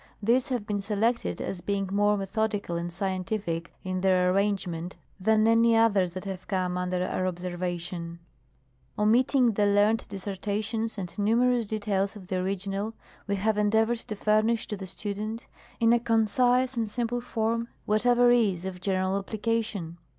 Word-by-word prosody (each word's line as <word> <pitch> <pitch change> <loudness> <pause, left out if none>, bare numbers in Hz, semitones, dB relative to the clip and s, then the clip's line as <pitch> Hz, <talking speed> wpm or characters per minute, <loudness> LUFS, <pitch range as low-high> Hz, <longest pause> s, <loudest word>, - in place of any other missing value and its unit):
These 240 +5 +2
have 245 -5 -2
been 205 -1 -2
selected, 220 +4 0
as 180 - -4
being 200 0 -1
more 205 +1 +3
methodical 200 -1 -2
and 170 +1 -3
scientific 185 -2 -3
in 185 0 -2
their 185 -1 +3
arrangement 190 -4 -1 0.2
than 215 +3 +3
any 230 0 +5
others 200 -6 +3
that 185 +2 -6
have 190 -2 -6
come 185 -2 -1
under 180 0 -1
our 185 - -1
observation. 175 -1 -4 0.8
Omitting 240 +4 +4
the - - -9
4 - - +5
PEEPAOE. 200 - +2
learned 210 +2 +3
dissertations 205 +3 -3
and 180 -3 -6
numerous 235 +2 +2
details 205 -2 -1
of 190 -3 -12
the 185 - 0
original, 195 +3 -2 0.3
we 200 - 0
Have 210 +2 0
endeavored 220 +3 +2
to 215 - -6
furnish 215 +2 +2
to 210 - -2
the 190 -1 -7
student, 215 +4 -4 0.3
in 230 0 +5
a 240 - +4
concise 245 +3 +2
and 225 -2 -1
simple 240 +2 -2
form, 230 -1 -1 0.2
whatever 245 +3 +4
is 200 -7 +2
of 185 -1 -6
general 190 0 0
application. 210 -5 -3
205 Hz, 160 wpm, -27 LUFS, 185-225 Hz, 0.8 s, any